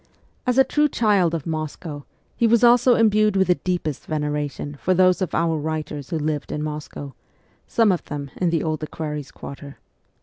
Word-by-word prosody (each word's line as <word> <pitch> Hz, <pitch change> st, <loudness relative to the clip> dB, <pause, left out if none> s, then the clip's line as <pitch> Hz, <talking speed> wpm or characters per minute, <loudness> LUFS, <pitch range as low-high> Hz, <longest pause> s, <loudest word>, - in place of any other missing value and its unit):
As 250 Hz, 0 st, +2 dB
a 265 Hz, -, +8 dB
true 295 Hz, +3 st, +2 dB
child 200 Hz, -9 st, +2 dB
of 155 Hz, -, -4 dB
Moscow 155 Hz, -1 st, -5 dB, 0.3 s
he 235 Hz, -, +3 dB
was 235 Hz, +1 st, +4 dB
also 245 Hz, +1 st, +6 dB
imbued 215 Hz, -2 st, +3 dB
with 190 Hz, -1 st, +2 dB
the -, -, +7 dB
deepest 175 Hz, -5 st, -3 dB
veneration 150 Hz, -1 st, -3 dB
for 185 Hz, -, +2 dB
those 185 Hz, +1 st, +4 dB
of 180 Hz, -3 st, -1 dB
our 165 Hz, -1 st, +1 dB
writers 150 Hz, -2 st, -4 dB
who 165 Hz, -, -1 dB
lived 150 Hz, -1 st, -2 dB
in 150 Hz, -, -3 dB
Moscow 150 Hz, -2 st, -6 dB, 0.5 s
some 225 Hz, -3 st, +3 dB
of 180 Hz, -, -1 dB
them 140 Hz, -2 st, -6 dB
in 180 Hz, -, +1 dB
the 165 Hz, -2 st, 0 dB
Old 155 Hz, -1 st, -2 dB
Equerries' 150 Hz, -2 st, -5 dB
Quarter. 140 Hz, 0 st, -10 dB
160 Hz, 180 wpm, -23 LUFS, 150-195 Hz, 0.5 s, a